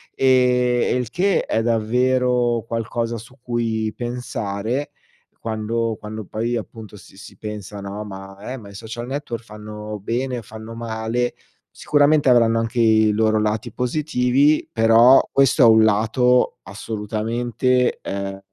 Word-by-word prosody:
e 125 Hz, -2 st, +3 dB
e -, -, +1 dB
il 125 Hz, -3 st, -2 dB
che 195 Hz, +2 st, +1 dB
è 115 Hz, -, -1 dB
davvero 120 Hz, +1 st, +1 dB
qualcosa 115 Hz, 0 st, -3 dB
su 120 Hz, +4 st, -13 dB
cui 115 Hz, -3 st, -2 dB
pensare 120 Hz, 0 st, -4 dB, 0.5 s
quando 115 Hz, 0 st, -2 dB
quando 110 Hz, 0 st, -7 dB
poi 115 Hz, +5 st, -3 dB
appunto, 110 Hz, -1 st, -7 dB
si 95 Hz, 0 st, -16 dB
si 100 Hz, -, -12 dB
pensa, 105 Hz, -2 st, -7 dB
no, 100 Hz, +2 st, -6 dB
ma 95 Hz, -1 st, -10 dB
ehm, 125 Hz, +4 st, -7 dB
ma 100 Hz, -, -12 dB
i -, -, -13 dB
social 115 Hz, +4 st, -7 dB
network 130 Hz, -4 st, -5 dB
fanno 105 Hz, -1 st, -8 dB
bene, 125 Hz, +3 st, -2 dB
fanno 110 Hz, +2 st, -10 dB
male, 115 Hz, +1 st, -2 dB, 0.4 s
sicuramente 145 Hz, -1 st, +2 dB
avranno 115 Hz, -2 st, +4 dB
anche 115 Hz, +2 st, -2 dB
i 110 Hz, -2 st, +4 dB
loro 110 Hz, 0 st, +2 dB
lati 105 Hz, +1 st, -2 dB
positivi, 135 Hz, +2 st, +1 dB
però 115 Hz, +3 st, +6 dB
questo 135 Hz, 0 st, +3 dB
è -, -, +8 dB
un 110 Hz, 0 st, +6 dB
lato 125 Hz, +4 st, +2 dB
assolutamente, 115 Hz, +4 st, -1 dB
ehm 100 Hz, 0 st, -5 dB
115 Hz, 135 wpm, -21 LUFS, 110-125 Hz, 0.5 s, è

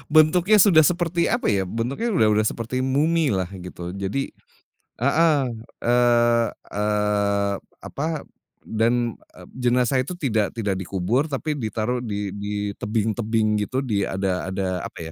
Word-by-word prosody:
bentuknya 175 Hz, +6 st, +5 dB
sudah 195 Hz, -5 st, +6 dB
seperti 170 Hz, -1 st, 0 dB
apa 240 Hz, -, +1 dB
ya? 95 Hz, -2 st, 0 dB
Bentuknya 135 Hz, -, -2 dB
udah 110 Hz, -, +4 dB
udah 105 Hz, +1 st, +2 dB
seperti 115 Hz, +3 st, -3 dB
mumilah 135 Hz, -, +1 dB
gitu. 90 Hz, -1 st, -7 dB
Jadi 100 Hz, +8 st, -3 dB, 0.7 s
heeh, 150 Hz, +4 st, +3 dB, 0.5 s
eee 120 Hz, -1 st, +4 dB, 0.3 s
eee, 105 Hz, -1 st, +1 dB, 0.3 s
apa 140 Hz, -, -5 dB, 0.6 s
dan 115 Hz, +1 st, +1 dB, 0.4 s
jenazah 125 Hz, +1 st, +2 dB
itu 145 Hz, -, -5 dB
tidak 110 Hz, -, 0 dB
tidak 100 Hz, -4 st, 0 dB
dikubur 95 Hz, -, -1 dB
tapi 150 Hz, +2 st, -2 dB
ditaruh 120 Hz, -1 st, -2 dB
di 105 Hz, -4 st, -4 dB
di 100 Hz, 0 st, -3 dB
tebing-tebing 110 Hz, +1 st, 0 dB
gitu 105 Hz, +5 st, -3 dB
di 105 Hz, -5 st, 0 dB
ada 95 Hz, -1 st, -2 dB
ada 95 Hz, 0 st, -2 dB, 0.2 s
apa -, -, -8 dB
115 Hz, 125 wpm, -23 LUFS, 100-135 Hz, 0.7 s, sudah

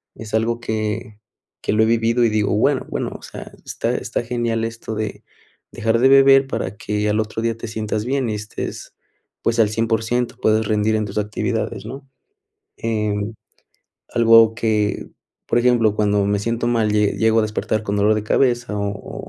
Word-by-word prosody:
es 110 Hz, -2 st, -10 dB
algo 115 Hz, +1 st, +1 dB
que 110 Hz, -2 st, -4 dB, 0.4 s
que -, -, -1 dB
lo 110 Hz, +1 st, +4 dB
he -, -, +4 dB
vivido 115 Hz, +1 st, +2 dB
y -, -, +3 dB
digo, 105 Hz, -1 st, 0 dB
bueno 135 Hz, +5 st, +2 dB
bueno, -, -, -3 dB
o -, -, -23 dB
sea, -, -, -9 dB, 0.2 s
está -, -, -2 dB
está -, -, -3 dB
genial 115 Hz, -1 st, -1 dB
esto 115 Hz, 0 st, -6 dB
de 110 Hz, 0 st, -2 dB, 0.6 s
de -, -, -10 dB
dejar 115 Hz, +1 st, +2 dB
de 130 Hz, +2 st, +5 dB
beber, 135 Hz, 0 st, +6 dB
para 105 Hz, -6 st, -4 dB
que 105 Hz, -1 st, -2 dB
al 105 Hz, +1 st, +1 dB
otro 110 Hz, +1 st, -4 dB
día 115 Hz, 0 st, 0 dB
te 115 Hz, +1 st, -7 dB
sientas 110 Hz, -1 st, -3 dB
bien 130 Hz, +1 st, -1 dB
y -, -, -1 dB
estés, 105 Hz, 0 st, -6 dB, 0.5 s
pues, 115 Hz, 0 st, 0 dB
al 110 Hz, -2 st, +4 dB
100%, 115 Hz, +2 st, -1 dB
puedes 110 Hz, 0 st, +2 dB
rendir 110 Hz, +1 st, +1 dB
en 110 Hz, -1 st, 0 dB
tus 105 Hz, +1 st, -3 dB
actividades, 105 Hz, 0 st, -3 dB
¿no? 135 Hz, +4 st, -9 dB, 0.7 s
Em, 105 Hz, -1 st, -2 dB, 0.8 s
algo 115 Hz, -1 st, +5 dB
que, 110 Hz, -2 st, -1 dB, 0.4 s
por -, -, 0 dB
ejemplo, 120 Hz, -3 st, +3 dB
cuando 105 Hz, -1 st, +2 dB
me 100 Hz, 0 st, +1 dB
siento 115 Hz, +3 st, -2 dB
mal, 115 Hz, -3 st, +1 dB
llego 110 Hz, +2 st, +2 dB
a -, -, +4 dB
despertar 110 Hz, 0 st, -2 dB
con 105 Hz, -1 st, -2 dB
dolor 105 Hz, +1 st, +3 dB
de 105 Hz, -, -1 dB
cabeza 120 Hz, -2 st, +1 dB
o 100 Hz, 0 st, -4 dB
110 Hz, 180 wpm, -20 LUFS, 105-115 Hz, 0.8 s, beber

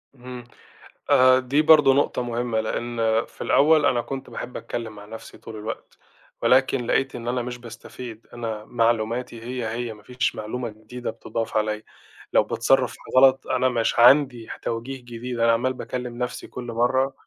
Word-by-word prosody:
إمم، 125 Hz, -1 st, -9 dB, 0.7 s
آآ، 130 Hz, 0 st, +6 dB
دي 135 Hz, +4 st, +1 dB
برضه 150 Hz, -3 st, +6 dB
نقطة 140 Hz, -2 st, +1 dB
مهمّة، 120 Hz, -1 st, -1 dB
لإن 115 Hz, 0 st, -1 dB
في -, -, -16 dB
الأول 150 Hz, 0 st, +4 dB
أنا 125 Hz, -3 st, +2 dB
كنت 135 Hz, +2 st, -6 dB
باحب 120 Hz, +1 st, -6 dB
أتكلم 115 Hz, -2 st, -6 dB
مع 105 Hz, 0 st, -11 dB
نَفْسي 110 Hz, +2 st, -10 dB
طول 110 Hz, -, -10 dB
الوقت، 110 Hz, +1 st, -7 dB, 0.4 s
ولكن 130 Hz, -1 st, +3 dB
لقيت 135 Hz, 0 st, +1 dB
إن 120 Hz, -1 st, -7 dB
أنا 125 Hz, +1 st, 0 dB
مش 125 Hz, 0 st, -5 dB
باستفيد، 115 Hz, -1 st, -10 dB
أنا 110 Hz, -3 st, -5 dB
معلوماتي 115 Hz, 0 st, -1 dB
هي، 125 Hz, 0 st, -4 dB
هي 115 Hz, +1 st, -4 dB
ما 105 Hz, -1 st, -17 dB
فيش 125 Hz, -1 st, -1 dB
معلومة 120 Hz, +3 st, -4 dB
جديدة 110 Hz, +3 st, -7 dB
بتضّاف 115 Hz, -1 st, -4 dB
عليَّ، 105 Hz, 0 st, -1 dB, 0.5 s
لو -, -, +5 dB
باتصرف -, -, +1 dB, 0.2 s
غلط 130 Hz, 0 st, +5 dB
أنا 130 Hz, 0 st, +2 dB
مش 120 Hz, -1 st, 0 dB
عندي 125 Hz, -2 st, +5 dB
ح -, -, -6 dB
توجيه 120 Hz, +4 st, -4 dB
جديد 120 Hz, 0 st, -6 dB
أنا 115 Hz, 0 st, +4 dB
عمّال 125 Hz, +3 st, +1 dB
باكلّم 125 Hz, -1 st, -6 dB
نَفْسي 125 Hz, 0 st, -4 dB
كُلّ 125 Hz, -, -8 dB
مرّه، 125 Hz, +3 st, +1 dB
120 Hz, 165 wpm, -24 LUFS, 115-130 Hz, 0.7 s, آآ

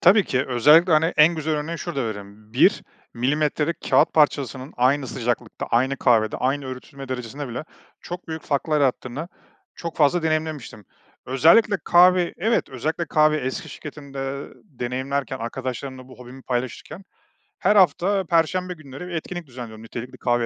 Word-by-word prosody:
Tabii 195 Hz, +2 st, +6 dB
ki 130 Hz, +1 st, 0 dB
özellikle, 150 Hz, +8 st, +5 dB
hani, 155 Hz, +1 st, +5 dB
en 155 Hz, +3 st, +6 dB
güzel 155 Hz, -1 st, -1 dB
örneğini 160 Hz, +3 st, -3 dB
şurada 140 Hz, -8 st, -3 dB
verelim. 105 Hz, 0 st, -8 dB
1 125 Hz, -, +4 dB, 0.3 s
milimetrelik 150 Hz, +5 st, 0 dB
kâğıt -, -, +4 dB
parçasının 140 Hz, -3 st, +1 dB
aynı 130 Hz, +2 st, +2 dB
sıcaklıkta, 120 Hz, -2 st, -3 dB
aynı 130 Hz, +3 st, +1 dB
kahvede, 110 Hz, -5 st, +2 dB
aynı 135 Hz, +2 st, -1 dB
öğütülme 130 Hz, +1 st, -9 dB
derecesinde 130 Hz, +2 st, -5 dB
bile 120 Hz, +6 st, -5 dB, 0.4 s
çok 175 Hz, 0 st, -8 dB
büyük 160 Hz, 0 st, -5 dB
farklar 150 Hz, +1 st, 0 dB
yarattığını 135 Hz, +3 st, -1 dB, 0.5 s
çok 170 Hz, -1 st, -6 dB
fazla 160 Hz, +3 st, +3 dB
deneyimlemiştim. 155 Hz, -9 st, -2 dB, 0.4 s
Özellikle 165 Hz, -, +5 dB
kahve 180 Hz, 0 st, +5 dB
Evet. 225 Hz, +5 st, 0 dB
Özellikle 155 Hz, +6 st, -3 dB
kahve 155 Hz, 0 st, +3 dB
eski 130 Hz, -2 st, -4 dB
şirketimde, 140 Hz, -2 st, -9 dB, 0.3 s
eee, -, -, -18 dB
deneyimlerken, 130 Hz, -, -3 dB
arkadaşlarımla 130 Hz, +2 st, -5 dB
bu 130 Hz, -, -14 dB
hobimi 125 Hz, +1 st, -12 dB
paylaşırken 130 Hz, +8 st, -4 dB, 0.6 s
her 210 Hz, -, +3 dB
hafta 190 Hz, 0 st, +3 dB
perşembe 180 Hz, +2 st, +1 dB
günleri 150 Hz, +1 st, -10 dB
bir 180 Hz, -, -7 dB
etkinlik 170 Hz, 0 st, -5 dB
düzenliyordum, 115 Hz, -3 st, -9 dB
nitelikli 120 Hz, +2 st, -8 dB
kahve 120 Hz, -1 st, +1 dB
140 Hz, 145 wpm, -23 LUFS, 125-160 Hz, 0.6 s, Tabii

